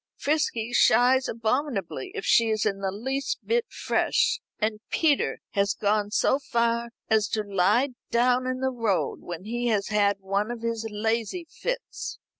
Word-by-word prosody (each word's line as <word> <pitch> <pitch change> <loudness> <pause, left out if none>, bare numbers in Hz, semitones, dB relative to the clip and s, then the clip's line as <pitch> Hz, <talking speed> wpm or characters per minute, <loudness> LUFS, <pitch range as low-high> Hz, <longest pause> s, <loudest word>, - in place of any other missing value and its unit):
Frisky 245 -6 0
shies 255 +2 +4
abominably 230 - -2
if 425 - -4
she 230 -1 +4
is 215 -1 0
in 200 -2 0
the 195 -1 -1
least 265 +8 -2
bit 465 0 +1
fresh, 485 0 +1 0.2
and 215 0 -1
Peter 300 -4 +1
has 200 -1 +1
gone 205 0 +1
so 265 +5 +2
far 235 -2 0 0.2
as 220 -2 +3
to 215 - -1
lie 205 +7 +2 0.2
down 250 +2 +2
in 255 0 -2
the 265 0 +1
road 230 -6 -1
when 175 0 -7
he 240 +3 -2
has 210 -3 +1
had 205 -1 +2
one 200 +2 -1
of 240 -1 -6
his 230 -1 -2
lazy 225 - -2
fits." - - -5
230 Hz, 160 wpm, -26 LUFS, 210-255 Hz, 0.2 s, shies